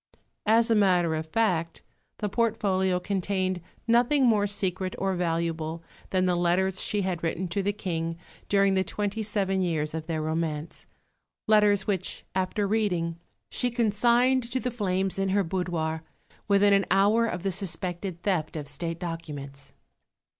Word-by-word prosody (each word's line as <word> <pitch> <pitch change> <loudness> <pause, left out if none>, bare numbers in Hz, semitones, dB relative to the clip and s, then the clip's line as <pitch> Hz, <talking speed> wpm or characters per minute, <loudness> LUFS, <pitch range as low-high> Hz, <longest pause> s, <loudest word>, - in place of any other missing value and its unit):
As 230 +2 +4
a - - +6
matter 180 -6 +3
of 160 0 -3
fact 170 -4 0 0.3
the 210 - -2
portfolio 195 -4 +1
contained 185 -1 -1 0.3
nothing 245 +4 +4
more 210 -4 +3
secret 185 -2 -2
or 195 0 0
valuable 165 -2 -2 0.3
than 185 -1 +1
the 180 -1 +2
letters 180 +2 +1
she 210 - 0
had 180 -3 -2
written 170 +2 -2
to 200 +4 -1
the 200 +1 +1
King 165 -5 -3 0.3
during 195 -1 +4
the 190 0 +2
twenty 205 +2 -3
seven 195 -3 0
years 155 -4 -1
of 160 -1 -5
their 160 -2 -2
romance, 160 0 -3 0.6
letters 210 -2 +4
which, 190 -3 -2
after 190 +2 0
reading, 180 -6 0 0.3
she 250 - +1
consigned 240 +3 +3
to 260 - 0
the 250 0 -2
flames 195 -4 -1
in 195 0 +1
her 200 +1 +2
boudoir 165 -3 -2 0.5
within 200 0 +5
an 195 -1 +3
hour 205 +5 +4
of 180 -5 -4
the 195 - 0
suspected 180 -1 -2
theft 175 -7 0
of 150 -2 -5
State 165 +4 -4
documents. 145 -6 -6
190 Hz, 155 wpm, -27 LUFS, 170-205 Hz, 0.6 s, a